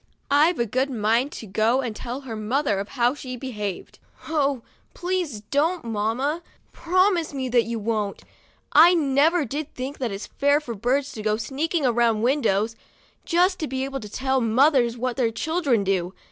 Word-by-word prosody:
"' - - -21
I've 310 +5 +4
a 235 - +1
good 255 +5 0
mind 235 +3 +1
to - - -7
go 220 +6 +1
and 235 -5 -4
tell 250 +4 -5
her 245 -5 -7
mother 215 -1 0
how 245 0 +1
she 255 -3 -7
behaved." 210 -7 -6 0.3
"Oh! 280 -6 0 0.3
please 355 - -2
don't, 320 +2 +1
mamma; 230 +9 -1 0.3
promise 360 -3 +1
me 260 -2 -2
that 240 -1 +3
you 230 0 -3
won't. 210 -2 -2 0.5
I 340 +4 +7
never 300 +2 +3
did 290 +5 -5
think 270 +3 -6
it 210 -5 -4
fair 285 +1 +4
for 255 -6 -6
birds 260 +6 0
to 215 - -7
go 215 0 0
sneaking 285 +7 -2
around 235 -3 +2
windows, 225 -5 +1 0.5
just 365 +2 +2
to 310 - -2
be 265 0 -2
able 270 0 -4
to 210 - -9
tell 265 +3 0
mothers 240 +1 +3
what 250 +1 -2
their 245 -4 +2
children 275 - 0
do. 190 -1 -1
260 Hz, 175 wpm, -24 LUFS, 225-290 Hz, 0.5 s, I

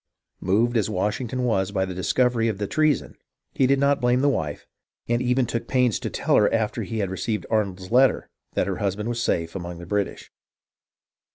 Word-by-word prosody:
Moved 115 +6 +2
as 110 - +1
Washington 115 +6 -2
was 100 -5 +1
by 95 -2 0
the 95 - -5
discovery 115 +5 +1
of 110 -3 -1
the 105 - -2
treason, 155 +5 +1 0.4
he 130 - +2
did 140 +1 +3
not 140 0 +2
blame 125 +1 +3
the 145 - +4
wife, 75 - -3 0.4
and 120 +1 +1
even 125 +1 +2
took 115 0 -3
pains 125 -5 +2
to - - -4
tell - - +1
her 105 - +4
after 110 -2 0
he 115 - -4
had 100 -3 -1
received 105 +3 -2
Arnold's 95 -4 -1
letter 130 +2 +4 0.3
that - - +1
her - - -3
husband 105 +3 -2
was 120 0 -2
safe 85 -6 -1
among 85 -2 -5
the 85 - -9
British. 100 +2 -3
110 Hz, 195 wpm, -24 LUFS, 95-125 Hz, 0.4 s, the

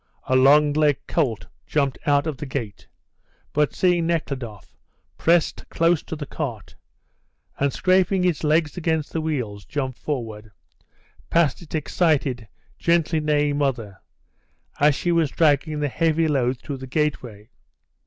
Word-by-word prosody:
A 130 - 0
long 145 +3 +5
legged 150 -2 +1
colt 130 -10 -1 0.2
jumped 140 -3 0
out 145 0 +3
of 155 -4 -3
the 150 - -6
gate; 115 -7 -5 0.7
but, 150 0 +1
seeing 175 -2 +2
Nekhludoff, 135 -10 -4 0.4
pressed 170 0 +1
close 165 -1 +2
to - - -7
the 150 -1 -6
cart, 125 -9 -6 0.9
and 140 0 +1
scraping 185 +2 +2
its 175 -4 0
legs 155 +1 +1
against 160 -3 -1
the 160 - -1
wheels, 125 -10 -3
jumped 130 +1 -4
forward, 110 -7 -5 0.8
past 170 -1 +2
its 165 -1 -7
excited, 145 - 0 0.3
gently 165 -1 +2
neighing 145 -1 +1
mother, 115 -8 -2 0.8
as 145 0 +4
she 175 - -1
was 165 -3 +2
dragging 150 0 +1
the 145 - +1
heavy 165 +3 +1
load 130 -4 +1
through 140 - -6
the 130 0 -9
gateway. 125 -7 -3
150 Hz, 140 wpm, -23 LUFS, 130-160 Hz, 0.9 s, long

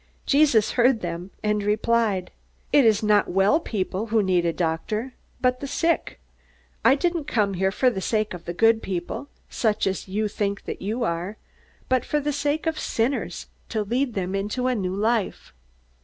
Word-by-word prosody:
Jesus 275 -7 +4
heard 245 -2 +3
them, 175 +1 -5
and 210 0 +1
replied: 210 -2 +1 0.4
"It 285 -4 +6
is 220 -1 +4
not 210 -1 +4
well 195 - +3
people 205 - -3
who 220 -1 +2
need 180 -2 +2
a - - +2
doctor, 185 +9 -2 0.3
but 250 0 +2
the 280 - -5
sick. 330 +4 0 0.6
I 265 - +6
didn't 340 0 -1
come 210 -9 +1
here 190 +1 +1
for 250 +5 +2
the 190 - -4
sake 215 +1 0
of 175 -2 -9
the 175 - -4
good 225 +2 +4
people, 180 +8 -4 0.2
such 215 -3 0
as 190 0 -2
you 210 +3 -1
think 200 -1 -2
that - - -5
you 220 +5 -2
are, 180 +2 -2 0.5
but 255 -1 +2
for 300 - 0
the 295 0 -1
sake 290 +3 -1
of 320 -1 -1
sinners 225 -7 -1 0.2
to 220 -2 -1
lead 245 +4 -1
them 190 -1 -2
into 205 +6 -2
a 255 - +2
new 190 -5 -2
life." 220 0 -1
215 Hz, 180 wpm, -24 LUFS, 195-255 Hz, 0.6 s, It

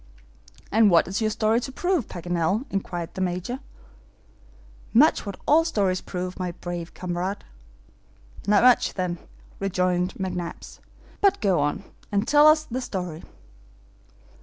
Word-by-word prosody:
"And 220 0 +5
what 170 -3 +4
is 195 +4 -2
your 215 - +2
story 215 +1 +1
to 265 - -5
prove, 350 - 0
Paganel?" 175 +6 -1
inquired 175 -3 -4
the 190 - -5
Major. 185 +8 -2 1.4
"Much 275 -3 +5
what 200 - -6
all 315 +3 +5
stories 200 - 0
prove, 180 0 -5
my 180 -1 -3
brave 175 -1 -6
comrade." 180 +2 -3 1.0
"Not 205 +1 +4
much 250 -1 +4
then," 180 -2 -2 0.4
rejoined 180 -1 0
McNabbs. 180 -2 -5 0.4
"But 400 -2 +4
go 190 -5 +2
on, 145 +5 0
Scheherazade, - - -23 0.2
and 205 +2 +1
tell 295 +1 +6
us 310 0 +5
the 255 -3 -4
story." 180 -8 -5
190 Hz, 135 wpm, -25 LUFS, 180-230 Hz, 1.4 s, tell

